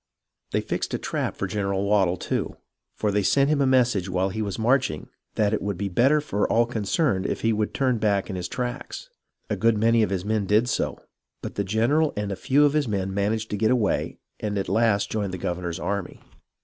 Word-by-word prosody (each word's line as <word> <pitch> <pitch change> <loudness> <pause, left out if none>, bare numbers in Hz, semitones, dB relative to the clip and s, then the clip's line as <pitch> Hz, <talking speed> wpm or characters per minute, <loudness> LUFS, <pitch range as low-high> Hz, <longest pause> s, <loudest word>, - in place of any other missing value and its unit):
They - - 0
fixed - - -3
a - - 0
trap - - -3
for - - -2
General 100 0 -1
Waddel, 95 -3 +2
too; - - -3 0.4
for 105 - 0
they 105 +1 +1
sent 140 +8 +3
him 145 -2 +2
a 135 - +3
message 120 -8 +2
while 95 +1 0
he 110 +3 -4
was 100 -3 -3
marching, 120 - +1 0.3
that 105 0 +2
it - - 0
would 100 -2 -3
be 100 +2 -2
better 130 +11 +3
for 105 -9 -1
all 120 +1 +4
concerned 110 - 0
if - - -3
he 115 0 +2
would 105 0 -1
turn 130 -4 0
back 100 -2 +1
in 95 - -5
his 90 -1 -3
tracks. 125 +4 -5 0.4
A - - -1
good 115 -1 +2
many 115 +2 +3
of 110 - +2
his 95 -1 -2
men 105 -2 0
did 110 +4 +3
so, - - -1 0.5
but - - -5
the 100 - -1
general 120 +10 +1
and 105 -1 -2
a - - -2
few 140 +8 +3
of 145 - +2
his 150 -3 +1
men 95 -3 -2
managed 110 +3 -1
to 105 - -1
get 110 +2 +2
away 120 -6 0 0.2
and 105 -1 -2
at 95 - -2
last 110 -3 +2
joined 100 -4 -2
the - - -5
governor's 85 0 -3
army. 100 +1 -3
105 Hz, 225 wpm, -25 LUFS, 100-120 Hz, 0.5 s, all